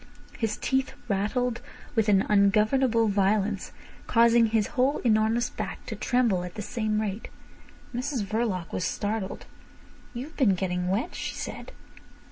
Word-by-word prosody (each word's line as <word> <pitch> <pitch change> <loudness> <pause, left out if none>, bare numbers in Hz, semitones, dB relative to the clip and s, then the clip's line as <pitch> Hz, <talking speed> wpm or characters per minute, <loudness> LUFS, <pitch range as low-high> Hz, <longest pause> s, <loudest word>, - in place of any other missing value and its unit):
His 225 -2 -2
teeth 265 0 0
rattled 235 +4 0 0.3
with 225 -2 +2
an 195 -2 +4
ungovernable 215 +4 +3
violence, 200 0 +1 0.4
causing 235 0 +5
his 215 -2 +1
whole 265 +3 +2
enormous 225 +1 +2
back - - -6
to - - -5
tremble 235 -8 +1
at 180 -1 -7
the 210 - -4
same 215 -3 -1
rate. 210 0 -3 0.7
Mrs 250 -2 -1
Verloc 205 -5 -2
was - - -1
startled. 205 +2 -3 0.7
"You've 270 +6 -6
been 220 -9 +3
getting 180 -1 -2
wet," 210 - -1
she - - -4
said. - - -6
215 Hz, 135 wpm, -27 LUFS, 200-240 Hz, 0.7 s, causing